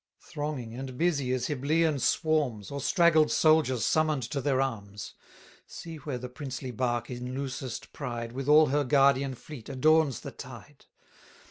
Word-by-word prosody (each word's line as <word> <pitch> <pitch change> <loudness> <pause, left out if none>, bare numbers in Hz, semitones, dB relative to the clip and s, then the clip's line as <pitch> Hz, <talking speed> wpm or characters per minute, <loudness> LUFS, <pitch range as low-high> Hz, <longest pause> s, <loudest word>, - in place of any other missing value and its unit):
Thronging 145 -6 -5
and 130 0 -7
busy 145 -6 +1
as 130 -1 0
Hyblaean 150 +2 +1
swarms, 145 - 0
Or 140 0 -4
straggled 165 -3 +4
soldiers 140 -2 +3
summon'd 155 -4 +1
to 140 - -1
their 135 -1 +1
arms, 105 -6 -4 0.5
See 165 -2 -8
where 145 -3 -5
the 125 +1 -6
princely 130 -1 -6
bark 120 0 -2
in 125 +1 -5
loosest 130 -2 -5
pride, 115 -1 -5
With 135 +3 -4
all 155 0 +7
her 145 +2 +2
guardian 135 -1 +3
fleet, 130 -1 -11
adorns 145 -1 +3
the - - -7
tide! - - -12
135 Hz, 150 wpm, -28 LUFS, 125-150 Hz, 0.5 s, all